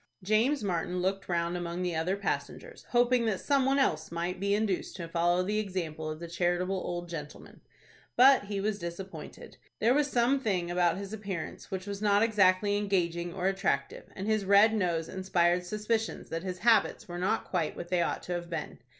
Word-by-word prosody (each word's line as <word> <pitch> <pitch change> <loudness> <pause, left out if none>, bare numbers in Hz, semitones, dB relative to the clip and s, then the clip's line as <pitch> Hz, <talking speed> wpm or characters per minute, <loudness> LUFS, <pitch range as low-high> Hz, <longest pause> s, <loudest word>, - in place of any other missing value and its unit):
James 220 +7 +2
Martin 180 -1 -1
looked 195 +2 -2
round 170 0 0
among 175 0 -3
the 175 -2 -1
other 175 +5 0
passengers, 475 - -4
hoping 245 -1 +3
that 205 -4 0
some 275 -2 +2
one 270 +1 +3
else 160 - +1
might 175 +2 -3
be 200 +1 +1
induced 205 -3 -1
to 170 -3 -6
follow 175 +2 +1
the 210 +3 0
example 170 -6 -4
of 155 0 -5
the 170 - -6
charitable 175 +2 0
old 175 -2 -4
gentle 150 -3 -7
man. - - -16 0.5
But 260 -3 +6
he 200 -1 -3
was 205 +1 -1
disappointed. 170 +3 -8 0.2
There 230 +3 +3
was 290 +1 +2
some 250 +2 +2
thing 185 -8 -1
about 175 0 +2
his 200 +1 -6
appearance, 195 -6 -6
which 190 -1 -4
was 200 0 -5
not 205 0 +4
exactly 205 -2 +3
engaging 175 -4 0
or 180 +1 -4
attractive, 195 0 -1
and 190 - -5
his 215 -1 +1
red 200 +3 +6
nose 170 -6 0
inspired 180 -2 +1
suspicions 215 +3 -2
that 165 - -3
his 185 0 -4
habits 225 -3 +3
were 175 -1 -6
not 190 +5 0
quite 170 -5 -1
what 175 - -7
they 180 -1 +2
ought - - -1
to 180 - -4
have 175 -1 -4
been. 165 -3 -5
190 Hz, 195 wpm, -30 LUFS, 175-210 Hz, 0.5 s, But